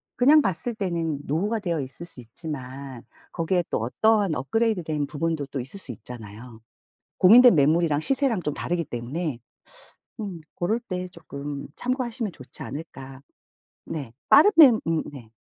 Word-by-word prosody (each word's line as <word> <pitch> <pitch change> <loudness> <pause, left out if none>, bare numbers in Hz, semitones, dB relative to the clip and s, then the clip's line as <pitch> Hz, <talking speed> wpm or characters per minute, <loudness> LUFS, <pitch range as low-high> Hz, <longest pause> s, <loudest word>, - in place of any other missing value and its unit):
그냥 290 +5 +6
봤을 195 - -2
때는 170 -7 -2
노후가 200 +10 -1
되어 170 -6 -2
있을 135 +6 -8
수 135 - -12
있지만 130 0 -8 0.3
거기에 175 +2 0
또 - - -1
어떠한 200 - +2
업그레이드 210 - 0
된 150 -2 -2
부분도 150 0 -2
또 135 - -5
있을 135 +11 -7
수 140 - -8
있잖아요. 115 0 -10 0.6
공인된 240 +5 +8
매물이랑 155 +1 +3
시세랑 260 - +1
좀 150 - -2
다르기 175 -1 -2
때문에 130 +3 -4 0.8
음 195 -6 -5
고럴 215 +7 -1
때 185 -6 -5
조금 145 -4 -7
참고하시면 245 -4 -2
좋지 130 -5 -10
않을까. 135 -3 -8 0.7
네. 140 -8 -6 0.2
빠르면 305 - +7
음. 165 -1 +1
네. 120 -6 -12
165 Hz, 310 characters per minute, -25 LUFS, 135-205 Hz, 0.8 s, 공인된